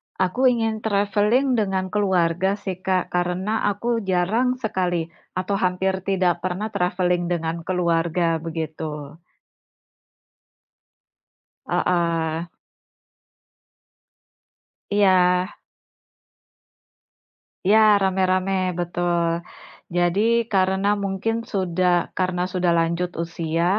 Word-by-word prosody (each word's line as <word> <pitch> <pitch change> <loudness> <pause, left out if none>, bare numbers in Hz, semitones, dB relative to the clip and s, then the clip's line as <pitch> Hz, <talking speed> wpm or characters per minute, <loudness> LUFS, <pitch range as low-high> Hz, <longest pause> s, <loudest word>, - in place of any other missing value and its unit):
Aku 190 +8 +2
ingin 225 -3 +1
traveling 215 +5 +1
dengan 190 -2 -1
keluarga 190 -2 +1
sih, 190 -3 -6
Kak, 185 -1 -1
karena 180 +5 -1
aku 230 +3 0
jarang 220 +8 +1
sekali 180 -8 -2 0.2
atau 185 +2 -1
hampir 190 +1 0
tidak 185 -3 +1
pernah 185 +4 -3
traveling 180 -1 0
dengan 170 -1 -2
keluarga, 170 -2 +1
begitu. 155 -2 -6 2.5
Heeh. 170 -1 0 2.4
Iya. 185 -2 +3 2.1
Iya, 210 +3 +5 0.2
rame-rame 185 0 +1 0.3
betul. 175 0 0 0.7
Jadi 175 +3 +2 0.3
karena 190 +1 +2 0.2
mungkin 195 +3 -1 0.2
sudah 185 -2 +1 0.3
karena 180 -1 0
sudah 180 -2 +1
lanjut 170 +2 0
usia, 165 0 -2
185 Hz, 80 wpm, -23 LUFS, 175-195 Hz, 2.5 s, Iya